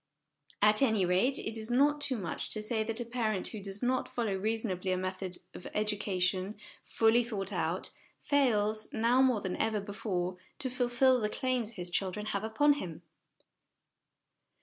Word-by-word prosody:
At 210 +2 +6
any 220 -8 +3
rate, 190 +10 +3
it 225 +1 -3
is 220 +1 -1
not 290 +4 +3
too 280 -4 -1
much 190 -5 -4
to 215 - -2
say 220 0 0
that 225 +1 -1
a 240 - -3
parent 225 -5 -1
who 215 - -7
does 195 +2 -3
not 255 +1 +1
follow 230 -5 -1
reasonably 195 -2 -1
a 185 - +1
method 185 0 -4 0.2
of - - -10
educa 210 -2 -1
tion, 185 +3 +1 0.3
fully 225 +2 +3
thought 205 -4 -3
out, 175 0 -1 0.3
fails 215 -7 +1
now, 235 +3 +3
more 255 -5 +3
than 185 -2 -3
ever 220 -1 0
before 190 -3 -3 0.2
to 260 - -3
fulfil 250 +1 +3
the 210 -2 0
claims 245 -2 -1
his 180 -3 0
children 195 +3 -1
have 200 +1 -1
upon 290 +7 +3
him. 175 -1 -7
215 Hz, 170 wpm, -31 LUFS, 190-240 Hz, 0.3 s, At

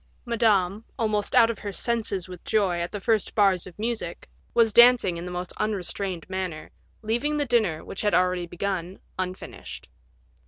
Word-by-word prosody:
Madame, 215 -4 +2
almost 215 -3 0
out 230 -2 +6
of 220 - -8
her 205 - -5
senses 210 -4 -1
with 180 -1 -10
joy 195 -5 +1
at 170 +1 -3
the 205 - -4
first 220 +1 0
bars 195 -4 +3
of 180 - -13
music, 230 +2 -4 0.2
was 225 -2 +3
dancing 240 -6 +6
in 170 +1 -6
the 180 - -6
most 180 0 -5
unrestrained 195 -3 -2
manner, 185 -5 -4 0.3
leaving 240 +8 0
the 290 - +1
dinner, 220 - +1
which - - -6
had 210 - +2
been 175 - +6
already 180 -1 0
begun, 185 0 -3 0.2
unfinished. 185 0 -6
200 Hz, 170 wpm, -26 LUFS, 180-225 Hz, 0.3 s, out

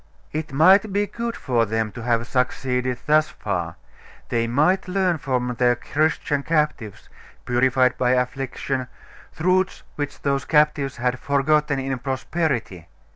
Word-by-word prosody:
It 155 -1 -4
might 190 +9 +5
be 205 +1 +1
good 235 +2 -4
for 120 -4 0
them 110 0 -1
to 120 - -9
have 115 0 0
succeeded 125 0 -1
thus 155 0 +3
far; 85 -5 -4 0.5
they 115 0 0
might 155 +12 +2
learn 180 -3 +1
from 125 -2 -1
their 120 -1 +4
Christian 145 +2 0
captives, 150 - -1 0.4
purified 125 +1 +2
by 125 0 +3
affliction, 130 0 -2 0.5
truths 185 +3 +1
which 145 -1 -5
those 140 -1 0
captives 150 -3 +2
had 125 +1 -1
forgotten 140 +1 +1
in 135 -1 -3
prosperity. 130 - -2
135 Hz, 130 wpm, -23 LUFS, 125-155 Hz, 0.5 s, might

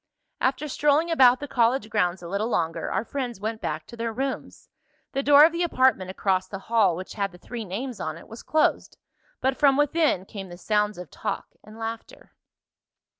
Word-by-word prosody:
After 270 +3 0
strolling 295 +4 +2
about 260 -5 +6
the 290 - -6
college 240 -2 +2
grounds 180 -4 0
a - - -6
little 200 +5 -1
longer 165 -8 -1
our 210 - -1
friends 250 -6 -4
went 220 +2 -4
back 155 +1 -3
to - - -11
their 230 0 -3
rooms. 265 +4 -5 0.4
The 275 - -1
door 285 +1 +8
of 330 - +3
the 340 +1 -3
apartment 255 - +2
across 185 -1 0
the 195 - -6
hall, 200 -3 +2
which 185 +2 -7
had 200 -2 -2
the 180 - -14
three 230 +4 -7
names 230 +6 -5
on 155 0 -4
it, - - -14
was 225 +1 -10
closed, 310 0 0 0.4
but 265 0 +1
from 275 -2 +4
within 295 - +2
came 195 -2 -8
the 175 - -10
sounds 210 +1 0
of 180 -5 -9
talk 205 +4 -4
and 215 +1 -13
laughter. 225 0 -7
225 Hz, 195 wpm, -25 LUFS, 190-270 Hz, 0.4 s, door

